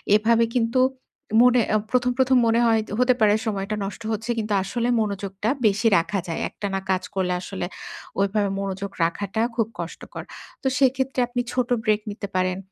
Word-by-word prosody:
এভাবে 230 +2 +4
কিন্তু 235 +1 +2 0.6
মনে 250 -1 +6
আ - - +6
১ম, 250 0 +2
১ম 260 -1 +4
মনে 230 +1 +3
হয় 225 -1 +3 0.2
হতে 250 0 +5
পারে 210 -2 +5
সময়টা 200 0 -2
নষ্ট 205 +3 -7
হচ্ছে 220 +2 -4
কিন্তু 215 -1 -1
আসলে 235 +5 -2
মনোযোগটা 200 0 -2 0.2
বেশি 210 +3 +2
রাখা 195 +4 0
যায়। 165 - -3
একটানা 195 -2 -3
কাজ 185 0 0
করলে 180 -2 0
আসলে 190 0 -4 0.5
ওইভাবে 200 0 +1
মনোযোগ 195 0 -4
রাখাটা 200 +5 -1
খুব 225 -2 +1
কষ্টকর। - - -7 0.4
তো - - -1
সেক্ষেত্রে 265 0 +1
আপনি 245 0 -1
ছোট 250 -1 0
break 215 0 +2
নিতে 205 0 -6
পারেন। 185 0 +1
215 Hz, 165 wpm, -24 LUFS, 195-240 Hz, 0.6 s, মনে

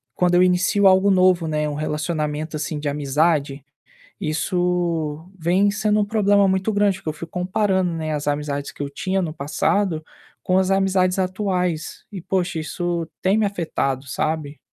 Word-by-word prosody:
quando 180 0 +2
eu 180 - +5
inicio 185 +3 +3
algo 190 +1 +5
novo, 185 -3 +3
né, 150 -1 -1
um 145 - -4
relacionamento, 155 0 -2
assim, 150 0 -3
de 145 - -2
amizade, 145 0 0 0.6
isso 170 -1 -1
vem 180 +4 +2
sendo 210 +1 +1
um - - +1
problema 205 -1 +3
muito 190 +3 0
grande, 205 -2 +2
porque 160 - -5
eu - - -3
fico 165 +1 -9
comparando, 185 0 0
né, 155 -1 -3
as 145 0 -3
amizades 145 -1 -2
que - - -10
eu 140 - -3
tinha 190 +7 -1
no 160 -4 -3
passado, 160 +3 0 0.4
com 185 - +1
as 190 0 +2
amizades 190 -1 +2
atuais, 185 -4 -2
e 190 - -6
poxa, 180 -1 -1
isso 170 +1 -3
tem 190 +3 +2
me 220 - +2
afetado, 150 -8 -2
sabe. 150 +1 -2
175 Hz, 165 wpm, -22 LUFS, 155-190 Hz, 0.6 s, eu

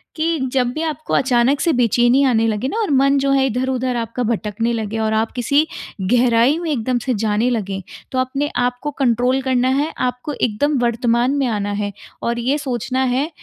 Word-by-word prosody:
कि 325 0 0
जब 255 -2 +1
भी 310 - -4
आपको 310 -1 -4
अचानक 255 +2 +2
से 335 - +2
बेचैनी 240 +2 +3
आने 225 -3 +2
लगे 215 +3 -1
ना 415 - -3
और 415 - -1
मन 275 +1 +4
जो 275 0 +1
है 270 -1 +3
इधर-उधर 255 0 -1
आपका 235 +1 -3
भटकने 225 +1 -1
लगे 220 -1 -3
और 220 0 0
आप 220 +1 0
किसी 280 +5 +1 0.4
गहराई 240 +6 +3
में 340 - -3
एकदम 250 -1 0
से 255 +2 -1
जाने 220 +2 0
लगे। 200 -5 -2 0.3
तो 260 - -1
अपने 275 +3 -1
आप 245 0 0
को 295 - -3
कंट्रोल 250 +1 +2
करना 255 -1 +1
है, 285 +4 0
आपको 250 +3 -2
एकदम 270 +5 0
वर्तमान 235 +1 +1
में 275 - +1
आना 205 -2 -2
है 205 0 -2 0.3
और 235 0 -1
ये 260 +5 0
सोचना 260 -2 -2
है 260 +4 0
250 Hz, 195 wpm, -19 LUFS, 230-270 Hz, 0.4 s, मन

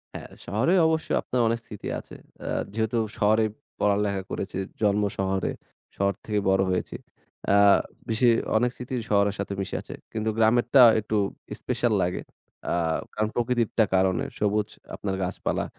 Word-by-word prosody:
হ্যাঁ, - - -7 0.2
শহরে 125 - +1
অবশ্যই 160 0 0
আপনার 125 -1 -1
অনেক 115 +1 0
স্মৃতি 105 - -8
আছে। - - -12 0.3
আ - - -2 0.2
যেহেতু 110 +2 0 0.2
শহরেই 110 +1 +3 0.3
পড়ালেখা 100 -1 +1
করেছি, 95 - -4 0.2
জন্ম 105 -1 +3
শহরে, 95 0 0 0.5
শহর 100 0 +2
থেকে 105 -1 0
বড় 95 0 +3
হয়েছি। 90 - -2 0.6
আ - - +6 0.5
বেশি 115 +2 +3 0.3
অনেক 120 +2 +2
স্মৃতি 125 +1 -5
শহরের 100 -1 +3
সাথে 100 0 -3
মিশে 95 - -4
আছে। - - -9 0.2
কিন্তু 110 0 -1
গ্রামেরটা 120 +4 +5 0.2
একটু 110 0 -3 0.4
স্পেশাল - - 0
লাগে। - - -1 0.5
আ - - +1 0.4
কারণ 110 0 0
প্রকৃতিরটা 120 -2 +1
কারণে 95 -2 +2 0.2
সবুজ 105 0 +1 0.3
আপনার 95 -2 -3
গাছপালা 90 +1 -2
105 Hz, 145 wpm, -26 LUFS, 100-115 Hz, 0.6 s, আ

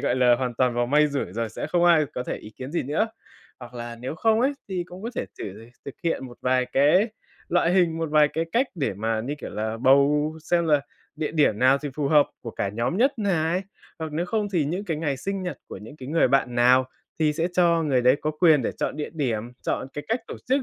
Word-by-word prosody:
gọi - - 0
là, 125 -1 +5
hoàn 125 -1 -3
toàn 125 0 +1
vào 120 0 +1
may 150 +4 +4
rủi 140 -10 -3
rồi 115 +2 -2
sẽ 110 - -5
không 175 -1 +1
ai 165 -4 +5
có 125 - -2
thể - - -3
ý 105 - -11
kiến 130 +5 -9
gì 170 - 0
nữa. 155 - 0 0.5
Hoặc 125 0 -11
là, 120 -1 -6
nếu 125 +6 -5
không 220 +6 +2
ấy 265 +3 +2 0.2
thì 185 -2 -2
cũng 180 +2 -11
có 230 - -4
thể - - -2
thử 105 +4 -8 0.2
thực 140 - -7
hiện 165 -5 -1
một 120 -1 -13
vài 125 0 +2
cái 155 - +4 0.4
loại 175 0 +2
hình, 175 -3 +2
một 165 -2 -2
vài 150 -1 +5
cái 165 +2 -2
cách 255 +4 +3
để 140 - -2
mà, 110 +2 -1
như 135 +6 -3
kiểu - - -7
là, 110 +1 -3
bầu 140 +4 +4
xem 170 0 +1
là 150 -2 +4 0.4
địa 150 -1 -3
điểm 145 -10 +2
nào 130 +3 +4
thì 145 - -5
phù 145 -1 -1
hợp 150 -1 +5
của 115 - -5
cả 100 - -2
nhóm 115 - -2
nhất 260 +4 +2
này, 180 -3 0 0.4
hoặc 160 -2 -5
nếu 170 +4 -1
không 210 +1 -1
thì 170 -5 +2
những 175 +8 -3
cái 165 -5 -2
ngày 150 -3 -1
sinh 195 +3 -3
nhật 180 -7 -5
của - - -7
những 110 +9 -12
cái 130 -3 -9
người 160 -1 +3
bạn 130 -2 +1
nào 125 +2 +4 0.3
thì 150 -1 +3
sẽ 165 +3 -1
cho 170 -2 +3
người 135 -5 +1
đấy 125 +2 +5
có 155 - 0
quyền 155 -2 +4
để - - -2
chọn - - -3
địa 150 - -4
điểm, 120 -7 -2
chọn - - -2
cái 145 - -5
cách 230 +2 0
tổ - - -6
chức. 270 +2 +2
150 Hz, 255 wpm, -25 LUFS, 125-170 Hz, 0.5 s, là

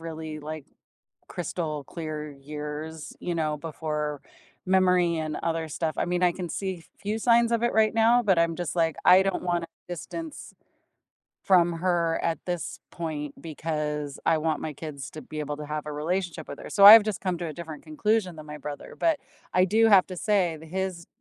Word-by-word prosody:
really 160 -1 -6
like 155 -1 -6 0.6
crystal 155 -4 -3
clear 155 -2 -6
years," 150 +2 -7
you 175 - -2
know, 155 -2 0
before 150 -1 -3 0.5
memory 180 -2 +3
and 155 -1 -3
other 165 -1 -1
stuff. 155 +1 -2
I - - +2
mean, 180 0 -1
I 180 - +5
can 180 0 -5
see 185 -2 -4
few 210 +2 -2
signs 235 0 +4
of 230 - +1
it 240 - +2
right 220 -1 +4
now, 230 +2 +5
but 190 -6 +3
I'm 170 0 +2
just 175 -1 -4
like, 165 -2 +2
"I 185 +1 +8
don't 195 -1 -1
wanna 175 -2 -1 0.2
distance 285 - -7 0.9
from 175 -3 +4
her 170 -2 +1
at 165 -1 0
this 175 -3 -4
point 150 -4 -5
because 150 -2 -3
I 165 - +4
want 155 0 -1
my 155 - -4
kids 140 -2 -7
to 155 - -8
be 155 - -7
able 150 -1 -3
to 150 - -6
have 150 0 -4
a 150 - -5
relationship 175 +4 -2
with 140 - -7
her." - - -8
So 200 -1 +5
I've 215 +1 +12
just 210 -3 -3
come 185 -2 -1
to 175 - -3
a 155 - -5
different 160 -2 -8
conclusion 185 +4 0
than 155 - -9
my 150 0 -8
brother, 145 0 -8
but 325 -3 +2 0.3
I 185 0 +5
do 220 +4 +4
have 200 -4 +6
to 185 - -6
say 185 -4 +1
that 160 +1 -13
his 185 0 -3
165 Hz, 195 wpm, -27 LUFS, 155-185 Hz, 0.9 s, I've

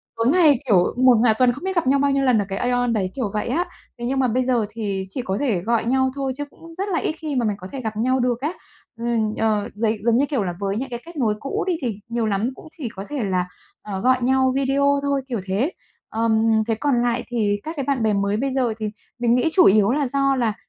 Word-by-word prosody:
tối 230 +1 0
ngày, 305 -4 +5
kiểu, 185 -6 +5
một 255 -1 +6
ng 220 - +2 0.2
tuần 250 -1 +4
không 280 - -10
biết 380 0 -2
gặp 335 -7 +1
nhau 275 +1 +4
bao 280 0 +2
nhiêu 275 0 +1
lần 255 -4 +4
ở 205 - 0
cái 195 - -3
Aeon 245 -1 +1
đấy, 190 -4 -1
kiểu 230 -7 -2
vậy 210 - -2
á. 335 +9 0 0.3
Thế 240 - -4
nhưng 265 +2 0
mà 255 - +3
bây 250 +2 0
giờ 245 -4 +2
thì 205 -3 -3
chỉ 255 - -3
có 190 -3 -2
thể 225 -11 0
gọi 230 +3 0
nhau 260 +2 +2
thôi 270 -1 -2
chứ 290 - -3
cũng 330 +2 -14
rất 390 +4 -3
là 345 -4 +1
ít - - -1
khi 305 -3 -4
mà 245 -2 +1
mày 210 -2 0
có 185 - -8
thể 270 - -5
gặp 220 -2 -4
nhau 255 +4 +1
được 245 -1 0
á. 305 +6 -1 0.5
Ừm, 230 -2 0
ờ, 215 -2 +1
giấy 220 +1 0
giống 235 0 +3
như 275 - +3
kiểu 265 -9 0
là 175 -2 -3
với 200 +1 -1
những 265 +2 -3
cái 240 -1 -5
kết 340 -1 -11
nối 225 -6 +1
cũ 275 - -2
đi 370 - +2
thì 220 -5 -3
nhiều 235 -1 -1
lắm 215 +3 0
cũng - - -13
chỉ 260 -7 -4
có 200 -3 -8
thể 285 -5 -2
là, 185 -2 0 0.3
ờ, 195 -2 -5
gọi 255 +4 +3
nhau 260 +1 +2
video 280 +1 +2
thôi, 280 -1 0
kiểu 240 -4 -2
thế. 210 - 0 0.4
Ờm, 220 0 +1 0.3
thế 225 - +1
còn 250 0 +1
lại 240 0 0
thì 210 -4 0
các 320 +2 -5
cái 280 - -2
bạn 270 -5 0
bè 215 -1 +2
mới 200 +1 0
bây 270 +2 -1
giờ 250 -4 +1
thì 215 -1 -3 0.3
mình 240 0 +3
nghĩ 250 +6 +2
chủ 365 - +6
yếu 205 +2 +5
là 285 +1 +1
do 275 +1 +1
là, 235 -4 +1
245 Hz, 275 wpm, -22 LUFS, 215-275 Hz, 0.5 s, một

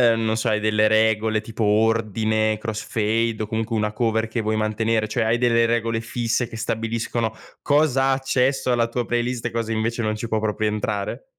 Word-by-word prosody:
non 110 -1 0
so 110 - -1
hai 105 - +2
delle 105 0 +2
regole 110 0 +2
tipo 115 0 -4
ordine, 110 0 +1
crossfade 110 0 -1
o - - -5
comunque 110 +1 -2
una 105 -1 0
cover 110 0 0
che 115 +1 -2
vuoi 110 0 -1
mantenere, 110 +1 0
cioè 115 +2 -1
hai 110 +2 +2
delle 115 -1 +3
regole 115 -1 0
fisse 120 +1 -1
che 115 - -10
stabiliscono, 115 0 -2 0.3
cosa 145 -2 +2
ha 135 - +3
accesso 135 0 0
alla 120 -1 +2
tua 120 +1 -2
playlist, 120 0 -2
e 120 - -1
cosa 115 0 -2
invece 115 +2 -1
non 110 -1 -1
ci 110 +2 -5
può 110 -1 0
proprio 110 0 -1
entrare? 105 - -3
115 Hz, 190 wpm, -22 LUFS, 110-115 Hz, 0.3 s, delle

